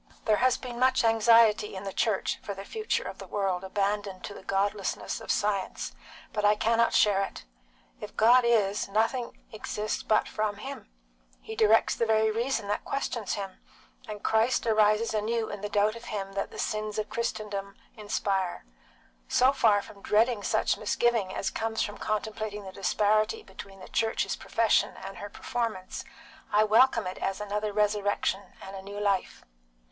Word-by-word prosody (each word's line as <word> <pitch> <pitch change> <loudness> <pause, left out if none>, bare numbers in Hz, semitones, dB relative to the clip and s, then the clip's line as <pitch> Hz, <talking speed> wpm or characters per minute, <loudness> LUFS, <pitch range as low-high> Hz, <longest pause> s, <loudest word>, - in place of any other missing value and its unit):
There 215 -1 +3
has 255 0 +3
been 245 -2 -7
much 260 0 +3
anxiety 225 -2 +4
in 190 - -6
the 195 -1 -5
Church 215 -4 0
for 200 - -5
the 195 +1 -8
future 435 - -2
of - - -7
the - - -9
world 195 -3 -1
abandoned 200 0 -2
to 205 - -6
the - - -10
godlessness 195 +1 -1
of - - -11
science, 205 -2 -1 0.4
but 210 - -1
I 210 0 +5
cannot 230 +2 +2
share 200 -2 +4
it. - - -7 0.5
If - - -9
God 245 +3 +6
is, 210 -4 +2
nothing 225 +4 -1
exists 215 -1 -3
but 215 - +2
from 215 -1 -2
Him. 270 +7 -8 0.5
He 220 - -8
directs 220 0 +4
the 230 - 0
very 220 0 +3
reason 230 -1 -1
that 205 - -1
questions 240 -5 -2
Him, 195 -2 -5 0.5
and 210 -1 -7
Christ 225 +3 +2
rises 215 0 +3
anew 220 +1 -1
in 205 - -6
the 210 - -3
doubt 210 +2 +2
of 230 +1 -10
him 195 -3 -4
that 195 0 -2
the - - -11
sins 215 0 -2
of 215 0 -1
Christendom 205 -4 -3 0.2
inspire. 200 - -2 0.6
So 260 +2 +4
far 210 -6 +3
from 200 - -14
dreading 220 +2 +2
such - - +1
misgiving 230 -6 +1
as 195 - -2
comes 225 0 -1
from 205 - -6
contemplating 215 -1 -3
the 190 - -8
disparity 215 - +1
between 195 - -11
the - - -10
Church's 225 0 0
profession 230 -1 +1
and 195 - -7
her 205 - -7
performance, 225 -5 -4 0.5
I 210 +1 +5
welcome 230 +1 +4
it 180 - -5
as 195 +1 -2
another 210 +1 -2
resurrection 205 -1 +1 0.2
and 195 +1 -8
a 190 - -7
new 200 +1 -7
life." 200 -2 -1
210 Hz, 170 wpm, -28 LUFS, 200-225 Hz, 0.6 s, God